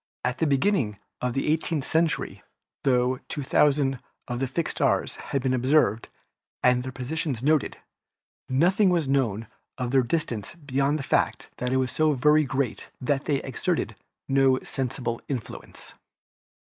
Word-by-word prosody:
At 125 0 -1
the 160 - +2
beginning 140 - +1 0.2
of 125 -1 -1
the 135 - -1
eighteenth 155 -1 0
century, 160 -1 0 0.4
tho 125 -1 +2
thousands 140 -1 +2 0.3
of 125 +2 -2
fixed 165 +5 -2
stars - - +1
had 135 -2 -3
been 130 -1 +1
observed 130 -2 +2 0.5
and 125 0 +4
their 130 +1 -5
positions 130 -1 -3
noted, 155 0 +2 0.7
nothing 180 +9 +4
was 170 -5 +1
known 120 -6 +1 0.3
of 125 -2 -2
their 135 -1 +5
distance 120 -4 -2
beyond 140 -2 0
the 145 - -5
fact - - 0
that 125 0 -2
it 130 - +2
was 130 -1 0
so 155 -1 +2
very 150 +3 +4
great 130 -3 -2
that 135 +2 -1
they 140 -3 0
exerted 135 - -2 0.3
no 135 -1 +4
sensible 120 -2 -3
influence. 130 -6 -7
135 Hz, 145 wpm, -26 LUFS, 125-150 Hz, 0.7 s, their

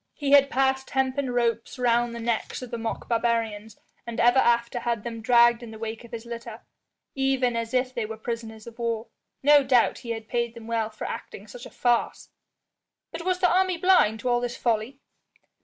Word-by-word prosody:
He 285 -2 -2
had 280 -1 +7
passed 265 0 0
hempen 265 0 0
ropes 235 -1 -1
round 240 -1 +1
the - - -6
necks 230 +2 -2
of 250 - -9
the 235 - -4
mock 225 0 -4
barbarians, 225 -2 -1 0.3
and 235 - -5
ever 245 +2 +5
after 235 0 +2
had 235 -3 -2
them 230 -1 -6
dragged 240 0 +5
in 235 - -9
the 220 - -9
wake 225 +1 -6
of 235 - -14
his 230 0 -7
litter, 235 -1 -8 0.5
even 265 -3 +1
as 230 0 -3
if 255 0 0
they 235 -4 -3
were 220 0 -7
prisoners 225 -1 -6
of 235 0 -12
war. 230 -1 -2 0.3
No 290 0 +6
doubt 255 -3 +3
he 240 - -10
had 225 -1 -4
paid 235 -1 -2
them 230 -1 -10
well 225 -1 -1
for 215 - -8
acting 200 - -7
such 240 +3 -10
a - - -13
farce." 240 -1 0 0.8
"But 335 - -7
was 370 -1 0
the 360 - +4
army 370 -1 +2
blind 330 - +3
to 255 - -1
all 240 0 +3
this 245 0 -3
folly?" 235 +3 -1
235 Hz, 205 wpm, -25 LUFS, 230-255 Hz, 0.8 s, had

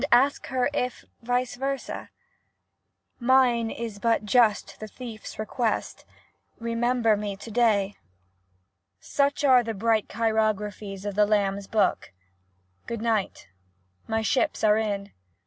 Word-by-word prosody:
Ask 270 +4 +4
her 255 -1 +1
if 250 -3 -2 0.2
vice 245 +1 -1
versa? 275 +1 -4 1.1
Mine 245 -2 +3
is 225 -3 -6
but 230 -1 +1
just 220 -1 +2
the 215 - -6
thiefs 225 -1 -9
request 220 +1 -2 0.2
— - - -36
* - - -39
Remember 230 -1 +1
me 205 -1 -4
to 210 +3 -10
day.' 210 -4 +2 1.1
Such 285 +1 0
are 260 -3 +6
the 225 -2 -4
bright 220 +1 +1
chirographics 210 -3 -1
of 205 - -2
the 210 +1 +3
'Lamb's 200 -2 0
Book.' 215 - +1 0.8
Good 230 -1 -4
night! 220 - -1 0.6
My 225 0 0
ships 285 +7 0
are 215 0 +5
in! 205 -2 -2
225 Hz, 130 wpm, -26 LUFS, 210-245 Hz, 1.1 s, are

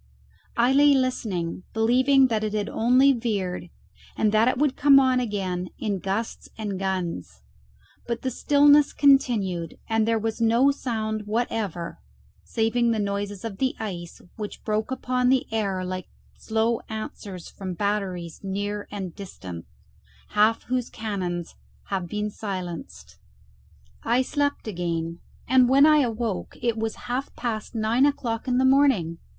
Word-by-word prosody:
I 240 +3 +4
lay 285 +1 +6
listening, 210 -11 -1
believing 255 +5 +4
that 220 -2 0
it 215 -1 -2
had 210 -1 -1
only 255 +4 +4
veered, 200 -7 -2 0.5
and 215 -1 +2
that 220 +2 +4
it 255 - +2
would 285 -1 +1
come 280 -1 +6
on 260 -1 +3
again 190 -6 -2
in 205 -3 -2
gusts 195 +5 -3
and 205 -4 -4
guns; 175 - -3 0.6
but 235 0 -3
the 260 - -1
stillness 290 +3 +5
continued, 210 - +2
and 225 -1 +1
there 230 0 +2
was 225 +1 -3
no 235 +5 +4
sound 220 -5 -3
whatever, 210 -6 -2 0.4
saving 235 +1 +1
the 230 - +1
noises 200 0 -3
of 210 -4 -6
the 260 -1 0
ice, 175 -6 -6 0.2
which 210 -2 -6
broke 215 0 -1
upon 255 -1 0
the 260 -1 +3
air 195 -4 -1
like 185 0 -5 0.3
slow 225 +1 0
answers 205 -4 -6
from 185 -2 -6
batteries 190 -4 -2
near 205 +1 -3
and 190 -4 -5
distant, 90 - -8 0.6
half 215 +2 +3
whose 250 -1 -2
cannons 185 -6 -4 0.4
have 190 -3 -2
been 210 +3 -3
silenced. 185 -5 -6 0.8
I 245 +3 +2
slept 285 -2 -1
again, 170 -3 -3 0.3
and 255 0 +5
when 275 +2 +6
I 305 0 +6
awoke 230 -7 -1
it 235 -1 0
was 225 0 -2
half 255 +3 -3
past 230 -1 -4
nine 230 +5 +3
o'clock 235 -5 -2
in 250 -1 +2
the 260 - +3
morning. 260 - +3
220 Hz, 145 wpm, -25 LUFS, 195-250 Hz, 0.8 s, lay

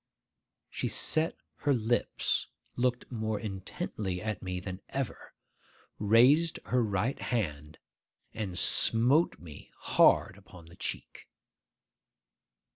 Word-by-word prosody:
She - - -2
set 160 +1 +1 0.2
her 145 -2 +1
lips, 120 +1 0 0.3
looked 125 0 -1
more 110 -3 -2
intently 95 -2 -4
at 110 0 -4
me 90 -1 -4
than 95 0 -7
ever, 135 -3 -5 0.6
raised 125 +10 +5
her 125 0 +1
right 105 +4 -1
hand, 75 - -3 0.6
and 100 -5 -4
smote 125 - +3
me 80 -4 -12
hard - - +3
upon 90 -2 -15
the 85 +1 -15
cheek. - - -6
110 Hz, 105 wpm, -30 LUFS, 95-125 Hz, 0.6 s, raised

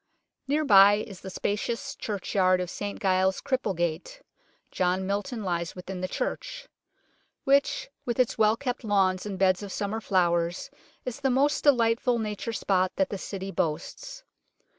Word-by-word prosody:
Near 300 +2 +1
by 200 -4 +8
is 205 -3 -6
the 190 - -7
spacious 230 +8 -2
churchyard 190 -3 +1
of 180 -1 -3
St 205 0 -5
Giles 190 -1 +2
Cripplegate 190 - -2 0.5
John 185 +1 0
Milton 205 +4 -3
lies 170 -3 -2
within 180 0 -7
the 185 - -1
church - - -4 0.8
which 280 - +2 0.2
with 240 0 -3
its 250 - +2
well 220 0 +3
kept 250 -2 -3
lawns 195 -2 +1
and 195 -2 -4
beds 185 0 +3
of 200 -1 -7
summer 210 +3 -3
flowers 175 -3 0 0.3
is 255 +1 -5
the 275 -1 +1
most 275 +3 +2
delightful 240 -2 +3
Nature 215 0 -3
spot 185 -3 +1
that 190 -1 +1
the 200 - -4
City 195 0 -5
boasts. 185 - -4
200 Hz, 150 wpm, -27 LUFS, 185-240 Hz, 0.8 s, by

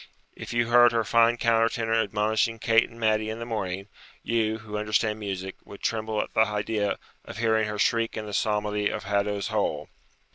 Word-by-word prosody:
if - - -8
you 120 0 +1
heard 120 0 +6
her 115 -1 +1
fine 115 +2 +3
counter 115 -1 +3
tenor 115 -1 -2
admonishing 110 +1 +1
Kate 115 +1 +3
and 115 - -15
Matty 110 -1 +1
in 110 - -4
the 115 - -6
morning, 100 -4 -4 0.4
you, 110 -1 0
who 105 -1 -9
understand 105 +1 0
music, 95 -2 -5
would 100 - -12
tremble 110 -1 -1
at - - -13
the - - 0
idea 105 0 -1 0.3
of - - -9
hearing 110 -1 +2
her 105 0 -4
shriek 115 +2 +1
in 110 - -4
the 105 - -7
psalmody 105 0 0
of - - -4
Haddo's 100 +1 -1
Hole.' 100 -9 -1
110 Hz, 190 wpm, -26 LUFS, 105-115 Hz, 0.4 s, heard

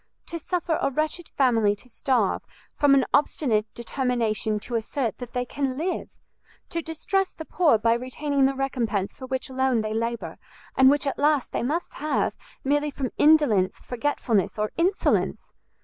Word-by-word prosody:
to 335 - -5
suffer 340 0 -1
a 275 - +2
wretched 310 +4 -2
family 225 -6 +2
to 205 - -13
starve, 240 -4 0 0.3
from 285 -1 +5
an 265 -2 +3
obstinate 225 -7 +2
determination 235 -4 -1
to 240 - -8
assert 230 0 -2
that 245 -2 -8
they 250 0 -1
can 265 0 -2
live! 350 +4 -3 0.5
to 335 - -2
distress 360 +4 -1
the 320 - -7
poor 315 -10 +3
by 230 +2 +3
retaining 265 +3 0
the 275 - -2
recompense 235 -7 -1
for 260 - -9
which 260 +1 -2
alone 260 -3 +1
they 215 0 -3
labour, 230 +1 -3 0.4
and 265 0 +7
which 290 +1 +2
at 275 - -2
last 295 -2 +2
they - - -1
must 305 +9 -2
have, 305 +1 0 0.3
merely 290 +2 +1
from 270 -3 -4
indolence, 290 -12 +4
forgetfulness, 240 -6 0
or 210 0 -1
insolence! 365 +4 0
265 Hz, 165 wpm, -25 LUFS, 230-295 Hz, 0.5 s, and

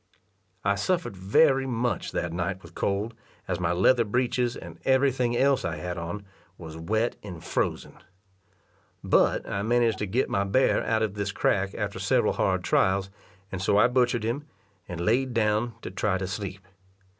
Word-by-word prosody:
I 100 - +3
suffered 165 - -1
very 135 - +3
much 120 -1 -1
that 85 -1 -2
night 90 +2 -3
with - - -13
cold, 100 +4 -1 0.3
as 90 -1 -2
my 90 -1 0
leather 115 +8 +4
breeches, 120 +2 0
and 85 -1 -10
every 135 +1 +4
thing 120 -2 0
else 140 +1 +3
I 85 -2 -2
had 85 +3 -4
on, 85 +5 -5 0.3
was 80 -2 -9
wet 110 +8 -1
and 90 -5 -9
frozen. - - -2 1.1
But - - +2
I 100 - -2
managed 115 0 +2
to 105 - -2
get 120 +8 +1
my 100 - 0
bear 130 +7 +2
out 110 -1 +1
of 105 -3 -1
this 100 -1 -2
crack 100 -1 0
after - - -3
several - - +2
hard - - 0
trials, 95 0 +2 0.4
and 95 - -4
so 100 - +2
I 120 - +6
butchered 125 -2 +1
him, 130 +7 -2 0.4
and 90 -2 -6
laid 120 +7 +1
down 110 +1 +1
to - - -5
try 95 0 0
to 95 - -3
sleep. 95 0 -5
105 Hz, 175 wpm, -27 LUFS, 95-120 Hz, 1.1 s, I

